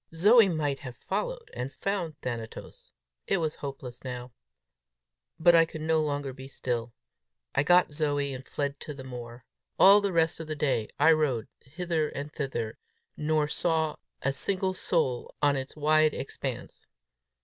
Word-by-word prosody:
Zoe 210 +5 +6
might 145 -5 -1
have 125 -4 -8
followed - - -3
and 125 +2 -4
found 170 -1 -3
Thanatos! 120 - -6 0.4
It 195 - +2
was 160 -3 -2
hopeless 130 -3 -7
now! 125 -1 -6 1.1
But 170 +1 +6
I 165 -1 +7
could 160 -1 -6
no 160 0 +2
longer 145 -3 -2
be 130 0 -10
still. 120 -3 -3 0.6
I - - +3
got 175 +3 +5
Zoe, 145 -2 0
and 130 0 -7
fled 140 +1 -3
to 150 - -7
the 135 - -8
moor. 120 -2 -8 0.3
All 200 +2 +8
the 200 -1 0
rest 165 -1 +2
of 160 - -6
the 155 - -3
day 130 -7 0
I 165 - +7
rode 145 -8 +1
hither 160 +1 -2
and 145 +2 -6
thither, 120 -6 -3 0.4
nor 155 0 +1
saw 160 0 0 0.3
a 135 - +1
single 190 +5 0
soul 160 -9 -1
on 145 -1 +3
its 135 0 -4
wide 155 +1 +3
expanse. - - -5
150 Hz, 160 wpm, -28 LUFS, 130-165 Hz, 1.1 s, All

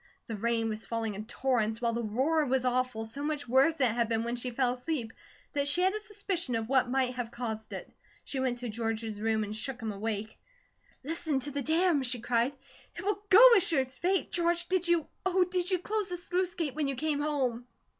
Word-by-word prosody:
The 225 - -5
rain 225 +1 0
was 215 0 -2
falling 225 -2 -2
in 210 +2 -7
torrents, 235 -4 0
while 235 -1 0
the 235 - -1
roar 265 +9 +1
was 255 0 +1
awful, 250 -3 0
so 225 +6 -7
much 295 -2 -2
worse 270 +6 +4
than 255 -6 +2
it - - -3
had 235 -1 0
been 225 -1 +1
when 235 +1 -2
she 245 +1 -4
fell 245 0 +1
asleep, 250 -3 -3 0.4
that 285 -1 +1
she 290 +5 +3
had 375 +1 +3
a 430 - -2
suspicion 395 - -2
of 225 -1 -2
what 260 -1 +3
might 255 -1 +1
have 245 -2 -4
caused 225 -3 -5
it. - - -6 0.4
She 270 - -4
went 255 -2 0
to 245 - -3
George's 225 -1 -3
room 220 0 +1
and 210 +1 -5
shook 250 +3 -3
him 220 -2 -3
awake. 215 +1 -4 0.6
"Listen 310 -1 -1
to 290 - -4
the 285 0 -2
dam!" 320 +1 +2
she 250 -1 -2
cried. 240 +3 +1 0.4
"It - - -6
will 405 0 0
go, 455 +6 +10
as 390 - +5
sure 315 -5 +3
as 260 0 -5
fate. 375 +2 0
George, 345 0 +1
did 365 -1 +1
you, 345 -2 +3 0.2
Oh, 375 0 +3
did 360 0 -1
you, 370 - +2
close 415 +2 -2
the 355 - -3
sluice 355 +1 -1
gate 310 -6 -2
when 300 -1 -1
you 275 - -1
came 295 +2 -1
home?" 255 -5 -1
260 Hz, 230 wpm, -30 LUFS, 230-330 Hz, 0.6 s, go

